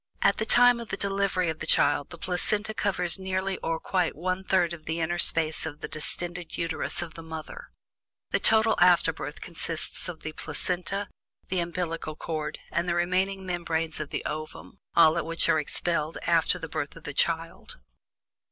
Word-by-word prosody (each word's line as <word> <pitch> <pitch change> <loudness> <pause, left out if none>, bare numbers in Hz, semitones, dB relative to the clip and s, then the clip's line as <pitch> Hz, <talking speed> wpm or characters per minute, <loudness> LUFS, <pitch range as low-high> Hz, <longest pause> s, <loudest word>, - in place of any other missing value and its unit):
At - - +4
the 220 - -2
time 245 0 +6
of 235 - -6
the 195 - -3
delivery 195 -2 0
of 160 - -4
the - - -5
child 145 - +3
the 175 - -9
Placenta 205 +5 +3
covers 190 -4 +1
nearly 190 0 -1
or 165 0 -2
quite 180 -3 0
one 185 +3 -2
third 180 -3 +2
of 155 -2 -10
the 160 +1 -2
inner 175 +2 -1
space 160 -2 +3
of 155 -1 -6
the - - -4
distended 175 +2 -6
Uterus 165 +1 -1
of 165 -2 -9
the 165 - -9
mother. 160 -1 -8 0.6
The - - +2
total 220 0 +5
"afterbirth" 165 -4 +3
consists 165 0 -3
of 165 -3 -8
the 155 - -5
Placenta, 180 +6 -3 0.4
the 185 - 0
umbillical 170 -2 -3
cord, 155 -2 -4
and 170 +1 0
the 170 - +1
remaining 190 +2 0
membranes 165 -3 -2
of 150 -2 -4
the - - -4
ovum, 155 +5 -6 0.2
all 160 -2 +6
of - - -1
which 165 0 +1
are 155 - +4
expelled 155 +1 -1
after 170 +1 +3
the 165 -2 -6
birth 145 -2 -4
of 165 - -13
the 150 - -6
child. 165 +2 -1
170 Hz, 180 wpm, -27 LUFS, 160-185 Hz, 0.6 s, time